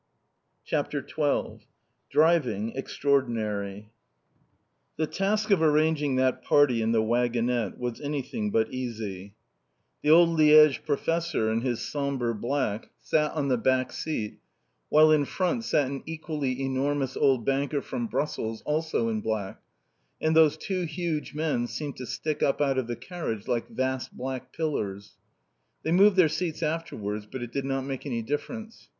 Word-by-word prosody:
CHAPTER - - -2
XII - - -1 0.5
DRIVING 130 -10 +2
EXTRAORDINARY 110 -7 -1 1.1
The 155 - +1
task 210 +5 -1
of 190 -5 +4
arranging 155 -2 +2
that 130 0 +1
party 135 -6 +4
in 110 0 +1
the 110 -1 +3
waggonette 120 -1 0
was 120 -2 -4
anything 150 - -3
but 220 +1 +1
easy. 105 -6 -5 0.7
The 150 - 0
old 170 +2 +7
Liège 150 -2 +7
professor, 160 -5 0
in 115 +1 0
his 120 -2 -1
sombre 140 -5 -2
black, 115 -1 -2
sat 150 -1 +1
on 145 -3 -1
the 125 -2 +2
back 130 +1 +1
seat, 110 -10 -4 0.5
while 155 +1 +6
in 150 -2 +4
front 190 - -1
sat 150 -8 +2
an 135 +1 -4
equally 155 -5 -3
enormous 135 0 -1
old 130 -5 +2
banker 140 +2 0
from 240 -2 -3
Brussels, 115 - -3
also 155 -5 0
in 110 -1 -1
black, 105 -3 -3 0.6
and 160 0 +1
those 160 -1 +5
two 185 +2 -3
huge 160 -3 -3
men 150 -6 0
seemed 145 +2 -5
to 125 - -6
stick 155 +4 -3
up 135 - +2
out 135 -2 +2
of 125 - -3
the 120 - -3
carriage 135 - -5
like 120 -2 -1
vast 130 0 -3
black 130 0 -5
pillars. 105 -11 -3 0.7
They 160 - -1
moved 195 +3 +6
their 185 -4 +6
seats 165 +1 -3
afterwards, 110 -10 -3
but 130 - -5
it 120 - -7
did 135 +2 -2
not 135 0 -1
make 135 +1 -5
any 115 -4 -2
difference. 220 - -5
140 Hz, 150 wpm, -27 LUFS, 120-155 Hz, 1.1 s, old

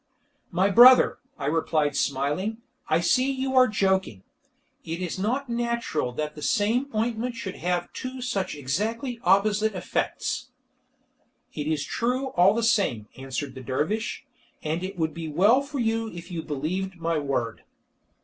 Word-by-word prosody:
"My 190 +3 +2
brother," 250 +4 +8 0.2
I 140 - -5
replied 150 -1 +1
smiling, 145 +11 -1 0.3
"I 160 +2 +3
see 255 +9 +3
you 265 0 -2
are 255 0 +7
joking. 190 - 0 0.6
It 165 +1 -4
is 180 0 -4
not 250 +8 -1
natural 235 - -1
that 150 +3 -3
the 150 - -10
same 230 - +1
ointment 230 +2 -1
should 210 -5 -6
have 175 0 -2
two 255 0 -6
such 205 -9 -2
exactly 220 - -2
opposite 205 +3 +3
effects." 185 - -2 1.0
"It 150 0 -4
is 155 -2 0
true 255 +3 -1
all 190 -2 +4
the 230 - 0
same," 190 - +1
answered 135 +1 -5
the 130 - -9
dervish, 150 - -2 0.4
"and 160 +3 -2
it 190 0 -5
would 160 -2 -1
be 165 -1 -5
well 200 - +4
for 280 +1 -6
you 225 -2 0
if 175 -1 -10
you 170 -2 -3
believed 170 +6 -3
my 165 -1 0
word." 130 -6 -2
190 Hz, 150 wpm, -26 LUFS, 155-230 Hz, 1.0 s, brother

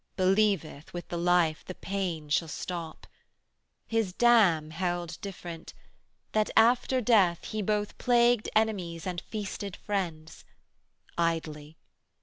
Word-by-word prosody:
'Believeth 190 -5 +1
with 175 - -6
the 175 - -3
life, 170 -2 +2
the 185 - -8
pain 185 -6 -3
shall 165 +2 +1
stop. 165 0 -6 0.9
250 - - -2
His 215 -5 +1
dam 190 -10 +4
held 175 0 -3
different, 175 -5 -8 0.6
that 215 -1 +1
after 250 +2 +4
death 200 -7 +3
He 215 - -3
both 210 0 -1
plagued 240 -2 +3
enemies 190 -7 0
and 180 -2 -3
feasted 205 -2 -5
friends: 165 -6 -4 0.8
Idly! 160 -2 -2
185 Hz, 120 wpm, -29 LUFS, 165-215 Hz, 0.9 s, dam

